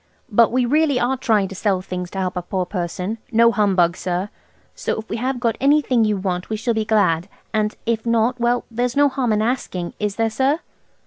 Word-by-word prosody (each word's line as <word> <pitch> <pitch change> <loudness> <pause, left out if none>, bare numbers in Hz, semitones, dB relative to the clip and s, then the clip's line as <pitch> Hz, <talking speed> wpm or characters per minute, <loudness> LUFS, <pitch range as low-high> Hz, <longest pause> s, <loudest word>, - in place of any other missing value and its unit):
But 230 +2 +5
we 250 0 +2
really 290 0 +2
are 250 +2 +1
trying 220 -7 +1
to - - -7
sell 195 -1 0
things 180 -1 -5
to 195 - -8
help 185 -1 -2
a 180 - -1
poor 185 +1 -2
person–no 215 +6 0
humbug, 190 -6 +2
sir–so 185 +3 -5
if 220 - -8
we 220 - -3
have 255 +2 -2
got 230 -2 0
anything 275 -5 +3
you 210 -1 +1
want 185 -2 -3
we 220 - -2
shall 235 +2 0
be 220 -1 0
glad. 205 -5 +2 0.2
And 215 -1 0
if 225 -1 0
not–well, 240 +1 +1
there's 245 +1 -1
no 285 0 +5
harm 260 -4 -1
in 215 0 +2
asking, 205 -8 -2
is 210 -1 -1
there, 225 0 0
sir?" 270 +8 +1
220 Hz, 200 wpm, -21 LUFS, 190-245 Hz, 0.2 s, But